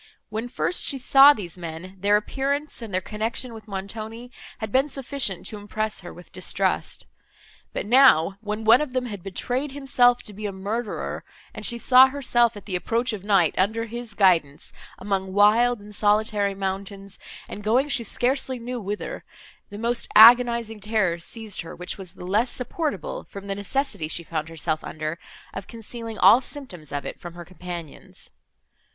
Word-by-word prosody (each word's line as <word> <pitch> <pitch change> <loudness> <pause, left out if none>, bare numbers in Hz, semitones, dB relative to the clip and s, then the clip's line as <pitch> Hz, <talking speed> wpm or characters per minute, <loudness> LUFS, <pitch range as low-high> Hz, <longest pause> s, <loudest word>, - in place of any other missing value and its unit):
When 220 +3 -4
first 355 - 0
she 275 - 0
saw 270 +2 +7
these 185 - -5
men, 170 +3 -8
their 205 +2 +4
appearance 280 +6 -3
and 225 -3 -7
their 185 0 0
connection 225 +5 -3
with 220 -1 -11
Montoni 220 +4 -6 0.3
had 220 -3 -5
been 270 +5 +2
sufficient 270 -8 -1
to 210 - -6
impress 215 +1 -2
her 175 - -9
with 175 - -14
distrust; - - -1 0.7
but - - -4
now, 200 - +5
when 215 0 -4
one 230 +4 +6
of 290 -4 -4
them 255 -1 -1
had 205 -6 -6
betrayed 250 +9 -3
himself 250 -3 +3
to 210 - -7
be 210 +1 -5
a - - -4
murderer, 205 +4 -4 0.3
and - - -8
she 235 - -1
saw 255 +2 +7
herself, 240 -4 +1
at 205 - -11
the 190 - -3
approach 230 +6 -1
of 200 -3 -6
night, 195 -6 +3
under 220 +4 +1
his 235 -1 -6
guidance, 165 -8 +2 0.2
among 190 -1 -2
wild 220 +4 +4
and 210 +1 -12
solitary 205 -1 +1
mountains, 195 0 -5 0.3
and 210 - -8
going 245 +7 +2
she 275 -4 +1
scarcely 260 +4 0
knew 245 +1 -5
whither, 210 - -5 0.5
the 205 - -9
most 235 +2 -1
agonizing 235 -1 +7
terror 205 -5 0
seized 220 +4 -5
her, 165 - -9
which 180 +3 -5
was 190 -1 -10
the 180 - -9
less 215 +7 +1
supportable 255 - -3
from 200 0 -9
the 200 - -2
necessity 200 - -1
she 170 +2 -2
found 160 -1 -4
herself 160 -1 -2
under 155 +1 -5 0.3
of 195 - -7
concealing 230 0 -7
all 210 +7 +7
symptoms 190 - -9
of 145 0 -4
it - - -7
from 175 -1 -9
her 175 0 -9
companions. 175 -3 -9
215 Hz, 175 wpm, -24 LUFS, 190-245 Hz, 0.7 s, saw